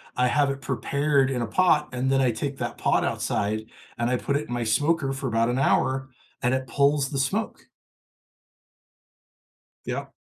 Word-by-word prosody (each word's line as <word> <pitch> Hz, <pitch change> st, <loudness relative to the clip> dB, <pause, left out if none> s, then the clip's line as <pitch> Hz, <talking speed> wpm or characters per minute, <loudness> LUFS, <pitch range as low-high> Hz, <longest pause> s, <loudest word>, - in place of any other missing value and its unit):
I 125 Hz, 0 st, +2 dB
have 140 Hz, +2 st, +2 dB
it 135 Hz, 0 st, -4 dB
prepared 140 Hz, -1 st, +1 dB
in 125 Hz, -2 st, -1 dB
a 115 Hz, -, 0 dB
pot, 150 Hz, -, +3 dB
and 130 Hz, +1 st, -1 dB
then 135 Hz, 0 st, +3 dB
I 125 Hz, -2 st, +3 dB
take 140 Hz, +5 st, -4 dB
that 120 Hz, -1 st, -4 dB
pot -, -, +2 dB
outside, 110 Hz, +2 st, -1 dB, 0.3 s
and 120 Hz, +1 st, +1 dB
I 125 Hz, -, +2 dB
put 140 Hz, +3 st, -1 dB
it 150 Hz, -, -5 dB
in 120 Hz, -, -5 dB
my 120 Hz, -, -1 dB
smoker 145 Hz, +5 st, +1 dB
for 135 Hz, 0 st, -4 dB
about 115 Hz, 0 st, +1 dB
an 125 Hz, +2 st, 0 dB
hour, 130 Hz, -1 st, +1 dB, 0.3 s
and 125 Hz, +1 st, +1 dB
it 130 Hz, 0 st, -1 dB
pulls 140 Hz, +2 st, +2 dB
the 140 Hz, -, -2 dB
smoke. 200 Hz, +12 st, -2 dB, 2.2 s
Yeah. -, -, -3 dB
135 Hz, 180 wpm, -25 LUFS, 120-140 Hz, 2.2 s, pot